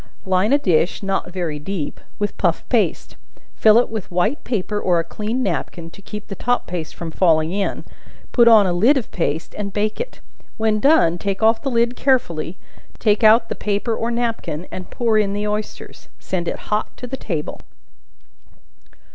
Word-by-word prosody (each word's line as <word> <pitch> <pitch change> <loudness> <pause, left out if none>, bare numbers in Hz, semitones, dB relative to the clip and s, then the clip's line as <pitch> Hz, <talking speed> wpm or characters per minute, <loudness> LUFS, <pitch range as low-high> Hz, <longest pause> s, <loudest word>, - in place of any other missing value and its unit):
Line 190 +4 +2
a 285 - +6
dish, 180 - +1
not 195 -2 -2
very 170 -5 -3
deep, 155 -1 -4 0.2
with 205 0 -2
puff - - 0
paste; - - 0 0.4
fill 215 0 +5
it 240 - +4
with 220 -4 -6
white 180 - 0
paper, 210 -3 -2
or 180 -3 +2
a 165 - +1
clean 215 +8 -3
napkin, 165 - -3
to 200 - -14
keep 210 +1 -8
the - - -7
top 245 +5 0
paste 170 -3 -5
from 170 -1 -6
falling 160 -2 +3
in; 200 +1 -2 0.5
put 235 -2 +5
on 220 -3 +7
a 180 - +1
lid 230 +12 +4
of 250 - -4
paste, 160 -2 -2
and 200 -2 -4
bake 215 +1 -1
it. - - -7 0.4
When 220 -1 +1
done, 210 - +4
take 200 +1 -2
off 225 +1 +4
the 275 - -2
lid 235 0 +1
carefully; 185 - 0 0.4
take 210 0 +2
out 225 +1 +6
the - - -3
paper 210 +2 -1
or 230 - -2
napkin, 225 -9 -2
and 185 -1 -7
pour 225 -3 +1
in 200 -2 0
the 205 +1 -2
oysters. 210 0 -5
Send 175 -2 -3
it - - -2
hot 210 +1 -1
to 250 - -7
table. 195 - -4
205 Hz, 180 wpm, -20 LUFS, 175-225 Hz, 0.5 s, on